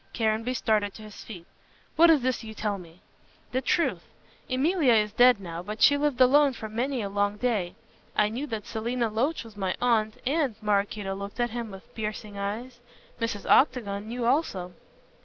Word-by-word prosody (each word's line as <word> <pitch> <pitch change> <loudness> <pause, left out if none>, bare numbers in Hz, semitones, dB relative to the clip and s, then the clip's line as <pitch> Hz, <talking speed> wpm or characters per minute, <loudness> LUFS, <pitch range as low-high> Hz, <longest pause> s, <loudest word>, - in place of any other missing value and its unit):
Caranby 225 +2 0
started 210 -4 0
to 220 - -10
his 215 -1 -11
feet. 180 -6 -10 0.5
"What 335 +1 +7
is 305 -6 +5
this 255 -1 -1
you 220 -1 -8
tell 205 -2 -2
me?" 170 0 -15 0.5
"The 260 - 0
truth. 335 +6 +1 0.5
Emilia 275 +1 +3
is 210 -1 +2
dead 245 0 +5
now, 170 -3 -6
but 210 +4 -7
she 285 - +6
lived 285 -3 0
alone 275 +2 +5
for 220 -2 -7
many 240 +3 -2
a - - -2
long 205 +1 0
day. 210 -7 -1 0.4
I 210 - +3
knew 255 +7 -4
that 220 -5 -5
Selina 235 +1 -2
Loach 260 +9 0
was 225 -2 -13
my 190 -2 -2
aunt, 220 -3 +2
and," 280 -3 +1
Maraquito 205 -1 -1
looked 200 +3 -7
at 240 -1 +1
him 235 -1 -4
with 195 -1 -12
piercing 215 -1 -5
eyes, 220 +5 -5 0.4
"Mrs. 225 -3 -3
Octagon 210 -7 +3
knew 240 +1 -3
also." 195 - 0
220 Hz, 180 wpm, -27 LUFS, 205-250 Hz, 0.5 s, What